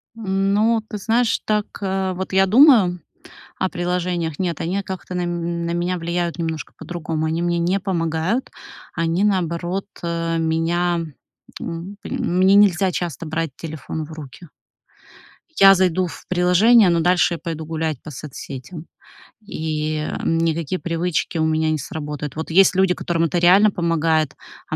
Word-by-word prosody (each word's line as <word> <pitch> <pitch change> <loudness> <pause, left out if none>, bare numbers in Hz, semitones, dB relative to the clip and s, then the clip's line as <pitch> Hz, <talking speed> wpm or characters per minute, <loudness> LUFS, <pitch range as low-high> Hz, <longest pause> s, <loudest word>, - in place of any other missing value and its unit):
Ну, 210 +2 +1
ты 210 - -4
знаешь, 225 +3 +1
так, 210 -1 +1 0.2
э, 190 -1 -1
вот 190 +1 -5
я 190 0 +5
думаю 215 - +5 0.6
о 185 - 0
приложениях: 175 -3 -2
нет, 175 -4 -2
они, 180 +4 -1
а, - - -2
как-то 190 -1 -7
на 180 - -1
м 170 -1 -3
на 170 - -2
меня 175 +1 -1
влияют 170 0 -2
немножко 160 -2 -4
по-другому. 160 -2 -4
Они 160 +2 -1
мне 175 0 0
не 175 +3 +1
помогают, 175 +4 -1 0.4
они 170 +3 0
наоборот, 180 -1 -1 0.2
э, 165 -1 -2
меня, 165 +2 0 0.6
м, 170 +4 -6
м 180 - -2
мне 190 +1 +5
нельзя 195 -2 +4
часто 170 -2 -4
брать 160 0 -2
телефон 155 0 -6
в 160 - -11
руки. 155 +2 -10 1.1
Я 195 0 +9
зайду 185 -1 +1
в - - -11
приложение, 185 +5 +5
но 170 -1 +2
дальше 175 +1 +2
я - - -6
пойду 160 -2 -5
гулять 160 -3 -3
по 155 - -9
соцсетям 145 +3 -8 0.6
и, 155 -4 -3
эм, 155 +1 -1
никакие 165 +1 -1
привычки 170 0 -2
у 160 - +1
меня 160 0 +1
не 155 - 0
сработают. 150 0 -6
Вот 160 +1 -5
есть 190 +2 +5
люди, 190 -1 +3
которым 170 -2 -1
это 170 +2 -1
реально 190 +5 +5
помогает, 165 -4 0 0.3
а - - -2
175 Hz, 160 wpm, -21 LUFS, 160-190 Hz, 1.1 s, Я